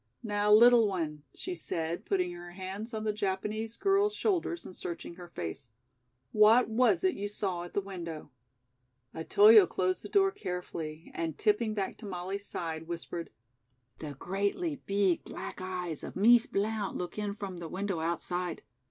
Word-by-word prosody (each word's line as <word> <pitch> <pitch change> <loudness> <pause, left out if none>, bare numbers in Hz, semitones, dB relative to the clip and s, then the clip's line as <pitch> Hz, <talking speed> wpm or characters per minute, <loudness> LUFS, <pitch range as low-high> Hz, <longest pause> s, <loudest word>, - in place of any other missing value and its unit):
"Now, 205 -1 +1
little 235 +1 +8
one," 160 -6 -3
she 365 - -5
said, 165 - -3
putting 180 -2 0
her 175 0 -9
hands 195 +5 -6
on 220 -2 -4
the 215 -1 0
Japanese 210 +3 -2
girl's 400 +1 +2
shoulders 345 -5 0
and 185 - -9
searching 170 0 -6
her 175 0 -10
face, 120 - -6 0.6
"what 220 +4 +6
was 250 - +3
it 375 -1 +3
you 205 +1 -4
saw 190 -4 -2
at 175 - -9
the 200 - +2
window?" 170 -6 -7 0.8
Otoyo 205 +4 +7
closed 185 +2 0
the - - -7
door 390 -1 +4
carefully 175 - -6
and, 165 -2 -3
tipping 215 +1 +1
back 195 -2 -3
to 215 - -8
Molly's 195 +2 -4
side, 160 -1 -4
whispered: 170 0 -5 0.7
"The 150 -2 -6
greatly 200 - -1
beeg 195 -3 +2
black - - -7
eyes 180 -4 -4
of - - -7
Mees 235 +4 +6
Blount 210 0 -1
look 180 +3 -5
in 205 -1 -2
from 195 -3 -6
the 170 -2 -6
window 195 -1 -2
outside. 175 +2 -2
195 Hz, 160 wpm, -30 LUFS, 175-215 Hz, 0.8 s, little